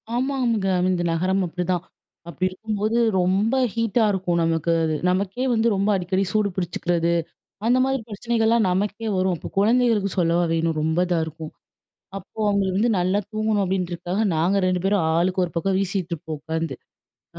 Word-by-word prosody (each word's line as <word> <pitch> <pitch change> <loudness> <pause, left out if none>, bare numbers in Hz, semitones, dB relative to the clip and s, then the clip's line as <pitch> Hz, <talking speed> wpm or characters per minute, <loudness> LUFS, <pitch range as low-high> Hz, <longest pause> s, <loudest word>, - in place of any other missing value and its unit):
ஆமாம்ங்க. 245 -5 0 0.2
இந்த 180 -2 0
நகரம் 185 +4 +1
அப்டிதான், 180 0 -2 0.5
அப்டி 170 +3 -2
இருக்கும்போது 215 +3 -2 0.2
ரொம்ப 195 +7 +2 0.2
ஹீட்டா 230 0 +1
இருக்கும் 180 -3 0
நமக்கு 165 0 0
அது. 160 -1 0
நமக்கே 195 +7 -1
வந்து 225 0 +2
ரொம்ப 200 +2 +1
அடிக்கடி 190 +1 0
சூடு 210 -1 +1
பிடிச்சுக்கிறது, 175 -2 0 0.5
அந்த 245 +2 +4
மாதிரி 270 -1 -1
பிரச்சனைகள்லாம் 225 0 +1
நமக்கே 205 +4 -2
வரும். 185 -1 +1
அப்ப - - -8
குழந்தைகளுக்கு 220 -2 +2
சொல்லவா 170 0 +2
வேணும்? 165 -1 0
ரொம்ப 160 +1 0
இதாருக்கும். 160 -2 -3 0.7
அப்போ 195 +3 -12
அவங்களுக்கு 195 -2 +1
வந்து 230 +3 +2
நல்லா 185 +3 +1
தூங்கணும் 215 -1 0
அப்படின்றக்காக, 180 0 -2 0.2
நாங்க 175 +5 +2
2 180 -1 0
பேரும் 195 -2 +2
ஆளுக்கு 185 +2 +1
ஒரு 170 - -9
பக்கம் 190 +3 0
வீசிட்டுருப்போம் 175 -5 -3
உட்காந்து. 160 +2 -3 0.6
அ, - - -8
190 Hz, 150 wpm, -23 LUFS, 175-215 Hz, 0.7 s, அந்த